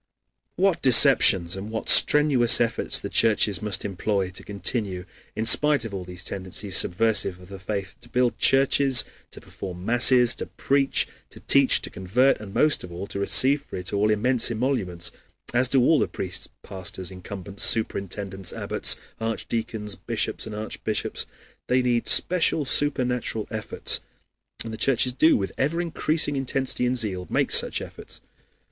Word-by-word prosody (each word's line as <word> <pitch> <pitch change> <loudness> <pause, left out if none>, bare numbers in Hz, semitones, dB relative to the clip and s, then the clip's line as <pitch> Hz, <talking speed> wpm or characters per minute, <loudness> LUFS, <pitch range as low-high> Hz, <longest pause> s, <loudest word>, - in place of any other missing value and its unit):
What 190 -1 +1
deceptions 115 -9 +5
and 100 +2 -7
what 110 0 -5
strenuous 145 -6 +5
efforts 115 -1 0
the - - -6
churches 110 -2 +2
must 105 -4 -3
employ 100 -1 -2
to 90 - -9
continue, 100 -2 -2 0.3
in 110 - -3
spite 145 0 +4
of 110 - -7
all 95 -2 -6
these 90 0 -8
tendencies 95 +1 -3
subversive 100 -1 +2
of 90 0 -16
the 100 -1 -10
faith, 100 0 -6
to - - -16
build 125 -1 0
churches, 135 -1 +3 0.2
to - - -12
perform 90 -1 -9
masses, 120 +1 +4
to - - -5
preach, 135 0 0 0.2
to - - -14
teach, - - +3
to - - -3
convert, 115 +9 +1
and, 105 -2 -10
most 150 +8 +2
of 90 - -10
all, 90 +3 -7
to 100 - -7
receive 135 +8 +4
for - - -11
it 90 +1 -5
all 105 +1 +1
immense 115 +3 +1
emoluments, 110 -8 -3 0.4
as 125 +1 +2
do 135 - +3
all 150 +4 +3
these - - -1
priests, 95 0 -3
pastors, 95 -1 -6
incumbents, 95 +1 -6
superintendents, 100 -3 -1
abbots, - - 0 0.2
archdeacons, 110 -1 -3
bishops, - - -3
and 110 - -7
archbishops. 110 0 -4 0.4
They 125 0 +1
need 120 -1 0
special 165 -4 +2
supernatural 125 -6 0
efforts. 110 0 -1 0.6
And 115 -1 -7
the - - -6
churches 125 +1 +1
do, 155 +5 +3
with 95 -2 -4
ever 150 +5 0
increasing 160 -3 -1
intensity 130 -1 -1
and 125 +1 -1
zeal, 95 -6 -3
make - - 0
such - - +1
efforts. - - -10
110 Hz, 160 wpm, -24 LUFS, 95-130 Hz, 0.6 s, deceptions